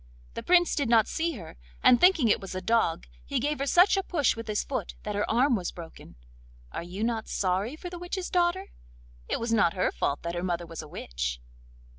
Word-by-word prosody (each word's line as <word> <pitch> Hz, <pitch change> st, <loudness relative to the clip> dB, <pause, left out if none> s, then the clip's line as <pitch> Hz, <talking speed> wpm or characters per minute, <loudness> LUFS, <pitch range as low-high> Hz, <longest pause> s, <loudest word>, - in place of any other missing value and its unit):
The -, -, -5 dB
Prince 350 Hz, -1 st, +4 dB
did 280 Hz, -5 st, 0 dB
not 230 Hz, -2 st, +5 dB
see 330 Hz, +1 st, -1 dB
her, 180 Hz, -, -10 dB, 0.3 s
and 245 Hz, -, +6 dB
thinking 355 Hz, -9 st, +5 dB
it 210 Hz, -, +2 dB
was 190 Hz, -1 st, -7 dB
a -, -, -1 dB
dog, 225 Hz, -5 st, +1 dB, 0.2 s
he -, -, -2 dB
gave 295 Hz, +3 st, -1 dB
her 275 Hz, -, -1 dB
such 360 Hz, +7 st, +5 dB
a 390 Hz, -, +1 dB
push 315 Hz, -8 st, +1 dB
with 230 Hz, 0 st, -7 dB
his 210 Hz, -1 st, -1 dB
foot 270 Hz, -, -4 dB
that 210 Hz, -, -3 dB
her 205 Hz, +1 st, -1 dB
arm 250 Hz, +3 st, +3 dB
was 180 Hz, -5 st, -2 dB
broken. 165 Hz, -2 st, -11 dB, 0.6 s
Are -, -, -4 dB
you 180 Hz, +5 st, -5 dB
not 225 Hz, -1 st, -1 dB
sorry 195 Hz, +7 st, -1 dB
for 355 Hz, +2 st, -8 dB
the 350 Hz, -, -7 dB
witch's 355 Hz, +1 st, -4 dB
daughter? 360 Hz, +2 st, +1 dB, 0.6 s
It -, -, -1 dB
was 230 Hz, 0 st, -1 dB
not 200 Hz, -6 st, +3 dB
her 185 Hz, -, +1 dB
fault 140 Hz, -, -2 dB
that 170 Hz, 0 st, -3 dB
her 175 Hz, -, -3 dB
mother 175 Hz, -1 st, -2 dB
was 165 Hz, -1 st, -7 dB
a 155 Hz, -, -11 dB
witch. -, -, -4 dB
230 Hz, 225 wpm, -28 LUFS, -, 0.6 s, and